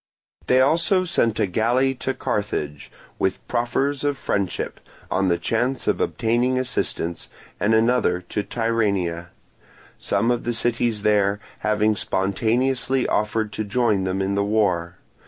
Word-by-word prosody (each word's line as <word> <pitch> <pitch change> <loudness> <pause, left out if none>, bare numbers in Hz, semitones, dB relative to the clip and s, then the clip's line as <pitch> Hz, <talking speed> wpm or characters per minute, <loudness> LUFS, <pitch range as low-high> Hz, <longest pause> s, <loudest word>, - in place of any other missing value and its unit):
They 130 +1 +5
also 165 +7 +3
sent 115 -10 +1
a - - +3
galley 120 +7 +1
to 130 0 -3
Carthage, 75 -8 -3 0.3
with 95 0 -1
proffers 130 +4 0
of 145 -1 0
friendship, 100 -8 -2 0.3
on 95 - +1
the 85 -1 +2
chance 125 +7 -1
of - - +1
obtaining 120 +3 +1
assistance, 105 -9 -2 0.3
and 110 +3 +3
another 110 -5 +2
to 90 +3 -3
Tyrrhenia; 100 -7 -1 0.7
some 105 +4 +1
of 120 -1 -1
the 120 - -1
cities 115 -2 0
there 105 -1 +2 0.2
having 105 0 +1
spontaneously 120 +8 0
offered 105 0 0
to 110 - -2
join 105 -2 +1
them 95 +1 -1
in 95 +1 -1
the 100 0 +1
war. 90 -5 0
110 Hz, 135 wpm, -23 LUFS, 100-125 Hz, 0.7 s, They